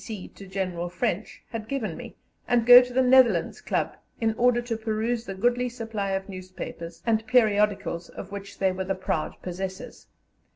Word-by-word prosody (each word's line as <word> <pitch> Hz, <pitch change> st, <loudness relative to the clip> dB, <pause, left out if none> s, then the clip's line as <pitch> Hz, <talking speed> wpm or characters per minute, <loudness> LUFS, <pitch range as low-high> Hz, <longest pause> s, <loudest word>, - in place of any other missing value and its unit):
D.C. 215 Hz, -5 st, -7 dB
to 195 Hz, -, -13 dB
General 185 Hz, -2 st, -3 dB
French, 210 Hz, +2 st, -3 dB
had 225 Hz, -2 st, -5 dB
given 220 Hz, -11 st, -3 dB
me, 235 Hz, -2 st, -9 dB, 0.3 s
and 240 Hz, -2 st, +2 dB
go 245 Hz, +1 st, +11 dB
to 250 Hz, 0 st, -5 dB
the 260 Hz, +1 st, +3 dB
Netherlands 250 Hz, -9 st, +4 dB
Club -, -, -1 dB, 0.2 s
in 225 Hz, -1 st, +1 dB
order 240 Hz, +1 st, +3 dB
to 240 Hz, -1 st, -3 dB
peruse 225 Hz, +1 st, -2 dB
the 195 Hz, -, -5 dB
goodly 245 Hz, +4 st, +1 dB
supply 225 Hz, -4 st, -4 dB
of 190 Hz, 0 st, -2 dB
newspapers 185 Hz, -3 st, -8 dB
and 225 Hz, -1 st, +2 dB
periodicals 210 Hz, -7 st, +2 dB
of 195 Hz, -, -9 dB
which 200 Hz, 0 st, -8 dB
they 190 Hz, -1 st, +2 dB
were 185 Hz, +1 st, -3 dB
the 195 Hz, +1 st, -1 dB
proud 170 Hz, -4 st, -2 dB
possessors. 185 Hz, +1 st, -6 dB
215 Hz, 175 wpm, -26 LUFS, 190-240 Hz, 0.3 s, go